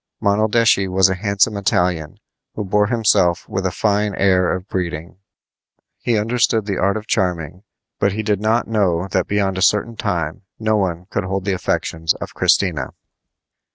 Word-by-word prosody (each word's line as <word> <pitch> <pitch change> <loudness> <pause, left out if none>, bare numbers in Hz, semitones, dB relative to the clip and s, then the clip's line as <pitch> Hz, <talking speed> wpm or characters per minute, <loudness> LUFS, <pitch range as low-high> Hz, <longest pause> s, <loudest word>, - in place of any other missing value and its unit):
Monaldeschi 105 0 +2
was 95 0 +3
a - - +1
handsome 100 +2 +1
Italian, 90 -5 -1 0.4
who 105 - -3
bore 105 +2 +2
himself 100 -6 +2
with 95 0 -2
a - - -2
fine 105 -1 0
air 95 -2 +2
of 95 +1 -4
breeding. 85 -3 -4 0.8
He 120 -2 0
understood 115 0 +1
the 100 -3 -2
art 100 +3 +1
of 110 - -7
charming, 90 -4 -1 0.4
but 100 - +1
he 110 +1 -3
did 105 -2 0
not 110 +2 +1
know 95 -5 0
that 95 - 0
beyond 100 -2 0
a - - -3
certain 105 +5 +2
time 90 -7 -2 0.2
no 110 -1 0
one 90 -4 -1
could 100 - -2
hold 95 0 -3
the 100 - 0
affections 80 -3 -1
of - - -8
Christina. 90 -7 +1
100 Hz, 165 wpm, -19 LUFS, 90-105 Hz, 0.8 s, was